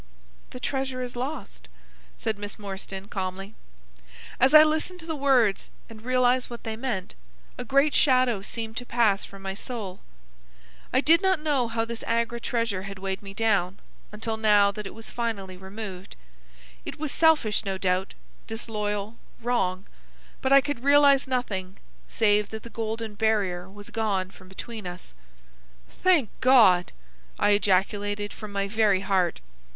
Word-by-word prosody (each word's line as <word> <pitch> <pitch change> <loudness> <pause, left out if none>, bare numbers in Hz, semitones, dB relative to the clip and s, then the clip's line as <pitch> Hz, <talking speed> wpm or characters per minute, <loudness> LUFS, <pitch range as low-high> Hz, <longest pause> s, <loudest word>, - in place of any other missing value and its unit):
"The 250 - -9
treasure 265 -1 -2
is 245 -1 -6
lost," 255 - -6 0.5
said 215 -2 -2
Miss 205 0 -6
Morstan, 195 -1 -7
calmly. 195 +1 -5 0.9
As 265 +4 +5
I 305 - +11
listened 315 +4 -1
to - - -11
the 320 -1 -3
words 260 -8 +2 0.2
and 220 -1 -11
realised 255 +1 +2
what 235 -1 -8
they 225 -1 -4
meant, 225 -6 -3 0.4
a - - -5
great 275 +2 +3
shadow 255 -6 +3
seemed 225 +2 -5
to 245 - -3
pass 220 -4 +2
from 195 0 -13
my 195 0 -3
soul. 205 -3 -6 0.9
I 260 - +3
did 330 +4 +5
not 380 -3 +2
know 290 -5 +1
how 225 0 -1
this 230 0 -5
Agra 235 +1 0
treasure 230 -5 -1
had 195 0 -7
weighed 190 0 -4
me 195 -1 -10
down, 200 -4 +1 0.3
until 220 +1 -4
now 210 -2 +4
that 210 0 -6
it - - -10
was 225 0 -10
finally 210 -6 -3
removed. 190 0 -8 0.7
It - - -7
was 310 -2 -3
selfish, 300 -12 +3
no 195 -2 -2
doubt, 185 0 -1 0.3
disloyal, 210 -1 -3 0.2
wrong, 195 -6 -1 0.6
but 265 - 0
I 275 0 +8
could 290 -3 -4
realise 280 -1 +5
nothing 200 -8 -3 0.3
save 210 -2 +2
that 220 0 -7
the 235 - -10
golden 225 -1 -4
barrier 200 -4 0
was 205 +3 -11
gone 200 -4 -1
from 185 -1 -16
between 215 +1 -7
us. 180 - -9 0.7
"Thank 340 - +2
God!" 225 -9 +6 0.5
I - - +3
ejaculated 205 +1 +1
from 215 -2 -9
my 200 0 -1
very 205 -2 +2
heart. 185 - 0
220 Hz, 155 wpm, -26 LUFS, 195-250 Hz, 0.9 s, I